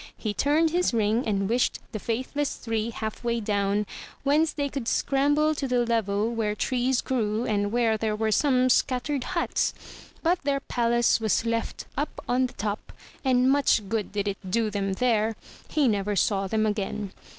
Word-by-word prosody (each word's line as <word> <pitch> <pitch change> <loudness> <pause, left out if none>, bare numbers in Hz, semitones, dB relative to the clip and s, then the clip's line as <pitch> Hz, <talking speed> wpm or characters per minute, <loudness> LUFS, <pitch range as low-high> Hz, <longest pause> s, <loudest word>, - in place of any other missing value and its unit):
He 215 -2 -3
turned 310 +7 +2
his 350 -7 +1
ring, 220 +3 +1
and 195 -2 0
wished 240 +3 +1
the 215 - -4
faithless 260 +6 -2
three 225 -1 -2
half 220 0 -5
way 235 0 0
down, 205 -1 0 0.4
whence 300 +3 +3
they 285 -1 -2
could 275 -4 -5
scramble 290 +4 +2
to 285 -2 -3
the 245 -1 +2
level, 220 -1 0
where 215 -2 -1
trees 255 +3 +1
grew 225 -2 -1
and 205 -1 0
where 230 -2 +2
there 215 0 -1
were 220 0 0
some 255 +1 +3
scattered 260 +2 +1
huts. 340 - 0 0.5
But 350 +2 +2
their 275 -1 0
palace 235 -2 +2
was 220 +1 +1
left 230 0 -2
up 290 +3 -3
on 255 +1 +2
the - - -15
top; 205 0 -4 0.3
and 255 -1 +3
much 270 -7 +3
good 220 -2 -2
did 205 0 -2
it 200 -1 -2
do 220 +2 +1
them 195 -1 -1
there! 225 0 +1 0.3
He 300 -4 +2
never 205 -2 0
saw 195 0 +1
them 220 +2 +1
again. 210 -1 -2
230 Hz, 175 wpm, -26 LUFS, 210-265 Hz, 0.5 s, whence